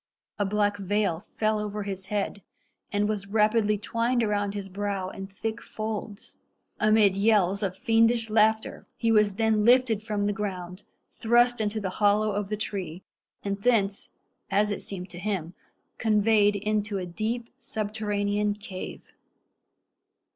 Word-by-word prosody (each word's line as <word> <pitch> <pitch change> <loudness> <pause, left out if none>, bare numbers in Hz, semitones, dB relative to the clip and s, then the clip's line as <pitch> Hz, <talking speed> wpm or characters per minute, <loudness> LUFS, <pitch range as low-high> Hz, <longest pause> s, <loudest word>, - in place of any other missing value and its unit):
A 205 - +2
black 205 0 +1
veil 200 -3 0 0.2
fell 215 0 +1
over 210 0 -3
his 190 -1 -5
head, 205 -1 -2 0.5
and 205 0 +1
was 205 -2 -2
rapidly 210 0 +2
twined 230 +3 0
around 205 -1 0
his 200 -1 -4
brow 195 -1 -3
in 195 0 -7
thick 220 +4 -5
folds. 215 -1 -6 0.4
Amid 215 -2 +4
yells 200 -2 +3
of 190 -2 -2
fiendish 230 0 +3
laughter 220 0 +1
he 230 -2 +1
was 210 -2 +4
then 220 -1 +2
lifted 240 -2 +4
from 210 -2 -2
the 205 - +1
ground, 185 -2 -5 0.3
thrust 240 +1 +3
into 215 +1 -1
the 190 -3 -3
hollow 210 +1 +4
of 205 -1 -2
the 210 - -2
tree, 190 -4 -4 0.4
and 200 0 -3
thence, 205 -4 +1 0.4
as 205 +2 +2
it 205 - -3
seemed 185 -2 -7
to 175 - -8
him, 180 -4 -3 0.5
conveyed 210 -1 +3
into 210 0 -1
a 185 - -3
deep 225 +7 -3
subterranean 210 -2 -1
cave. 200 -3 -8
210 Hz, 145 wpm, -27 LUFS, 200-220 Hz, 0.5 s, Amid